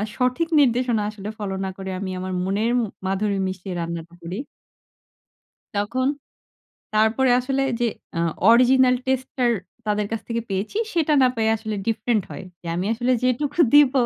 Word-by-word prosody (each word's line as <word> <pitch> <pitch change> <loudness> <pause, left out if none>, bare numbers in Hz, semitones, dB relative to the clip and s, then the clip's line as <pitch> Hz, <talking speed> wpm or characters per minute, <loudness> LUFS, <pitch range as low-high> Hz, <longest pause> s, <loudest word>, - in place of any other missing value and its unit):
সঠিক 255 +6 +1
নির্দেশনা 245 -4 +2
আসলে 210 -1 -7
ফলো 195 -2 -3
না 190 - -2
করে 190 0 -6
আমি 190 -2 -4
আমার 185 0 -4
মনের 205 +5 0
ম - - +2 0.3
মাধুরী 195 +1 0
মিশিয়ে 185 0 -5
রান্নাটা 170 0 -5
করি 175 +4 -5 1.4
তখন, 250 +6 0 0.9
তারপরে 220 +4 +3
আসলে 270 +2 -1 0.2
যে 240 - +3 0.3
আ - - +1 0.3
অরিজিনাল 255 +2 +6
টেস্ট 260 0 0
টার 240 -1 +3 0.3
তাদের 210 -1 0
কাছ 225 - -1
থেকে 230 0 -1
পেয়েছি 195 - -2
সেটা 320 -3 +1
না 255 - +6
পায় 220 -1 +2
আসলে 215 0 -5
ডিফরেন্ট 225 -1 +1
হয়। - - -7 0.2
যে - - -11
আমি 180 +3 -1
আসলে 245 +2 +1
যেটুকু 270 +5 0
দিব 290 -2 +7
225 Hz, 160 wpm, -23 LUFS, 195-255 Hz, 1.4 s, দিব